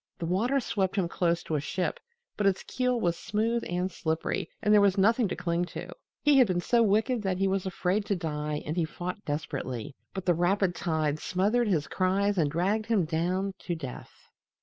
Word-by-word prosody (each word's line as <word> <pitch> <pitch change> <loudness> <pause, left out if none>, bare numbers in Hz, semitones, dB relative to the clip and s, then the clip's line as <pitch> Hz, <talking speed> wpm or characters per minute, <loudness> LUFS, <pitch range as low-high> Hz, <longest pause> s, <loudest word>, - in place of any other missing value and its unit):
The 170 - -4
water 225 +11 +1
swept 195 -6 -1
him 190 -4 +1
close 170 0 0
to - - -5
a 150 - +2
ship, 175 +6 -2 0.4
but 205 - +1
its 195 -1 +1
keel 250 -1 0
was 170 -5 +1
smooth 225 +4 -1
and 180 +2 -1
slippery 160 0 -2
and 210 - +3
there 210 - +7
was 200 -1 +3
nothing 225 +4 +4
to - - -3
cling 170 0 -1
to. - - -6 0.3
He 290 -2 +6
had 250 - +6
been 180 -2 0
so 235 +6 +2
wicked 220 +3 +2
that 190 -3 -1
he 195 +1 +2
was 195 0 0
afraid 190 +3 0
to 205 - 0
die 150 -3 -3
and 155 - -3
he 175 - +1
fought 180 +5 -5
desperately, 145 -3 -4 0.2
but 190 - -4
the 175 - +4
rapid 180 +2 +2
tide 155 -3 -1
smothered 210 +8 +1
his 165 -7 +1
cries 195 +1 +1
and 150 -3 +3
dragged 195 +8 0
him 215 -7 +2
down 180 +5 -1
to 175 - -3
death. 135 -6 -7
185 Hz, 205 wpm, -28 LUFS, 170-210 Hz, 0.4 s, there